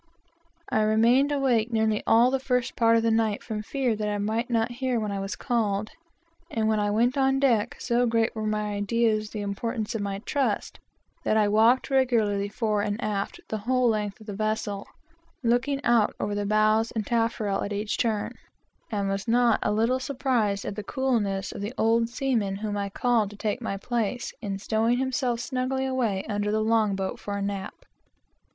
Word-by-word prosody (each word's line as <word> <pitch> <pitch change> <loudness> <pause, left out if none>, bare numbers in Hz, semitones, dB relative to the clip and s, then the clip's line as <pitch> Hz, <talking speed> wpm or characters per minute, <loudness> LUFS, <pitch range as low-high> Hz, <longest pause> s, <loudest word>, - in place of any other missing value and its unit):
I 220 - +2
remained 230 +6 +4
awake 250 -5 +1
nearly 220 -2 +1
all 235 +3 +5
the 270 - +1
first 250 -2 -1
part 230 -1 +4
of 225 - +1
the 230 - +2
night 220 -2 +1
from 215 -2 -4
fear 250 +1 -1
that 210 0 -2
I 205 - -1
might 220 +4 -1
not 230 0 +1
hear 255 -3 +1
when 210 -2 -2
I 200 - -2
was 195 0 -4
called; 215 -4 -1 0.6
and 220 -2 0
when 220 -1 +2
I 205 0 +1
went 240 +6 +2
on 270 0 +3
deck, 240 -7 +2
so 240 0 +1
great 230 0 +1
were 215 -1 -2
my 210 -1 -1
ideas 215 +1 +1
of - - -15
the 210 - -3
importance 220 +2 -3
of 225 - -2
my 200 -1 -2
trust, 280 -2 -1 0.4
that 215 - +2
I 210 -1 +4
walked 225 +6 +3
regularly 220 -7 +2
fore 215 -1 0
and 205 +1 -2
aft 205 -2 -3
the 215 - -3
whole 250 +3 +2
length 210 -1 -2
of 215 - -14
the 210 - -6
vessel, 215 -1 -2 0.6
looking 245 +4 +1
out 235 -3 +3
over 205 - -2
the 205 0 -2
bows 215 +2 +3
and 220 -3 -3
taffrail 225 -3 0
at 200 - -3
each 205 +1 -2
turn, 220 -4 0 0.6
and 200 -2 -1
was 195 +1 -2
not 235 0 +3
a - - +1
little 230 +5 +2
surprised 245 -7 0
at - - -4
the 210 - -5
coolness 205 -6 -1
of - - -7
the 210 +5 -5
old 230 +1 +2
salt 255 0 0
whom 205 +1 -3
I 200 -1 -2
called 225 0 +1
to 205 - -12
take 215 +3 -2
my 195 -4 -3
place, 240 +2 -2
in 200 -3 -3
stowing 220 +4 +1
himself 260 -2 0
snugly 260 +1 -1
away 235 -7 -1
under 205 -1 -1
the 215 0 +1
long 220 -2 +2
boat, 190 -1 -3
for 205 0 -4
a - - -3
nap. 200 -1 -5
220 Hz, 200 wpm, -26 LUFS, 205-240 Hz, 0.6 s, all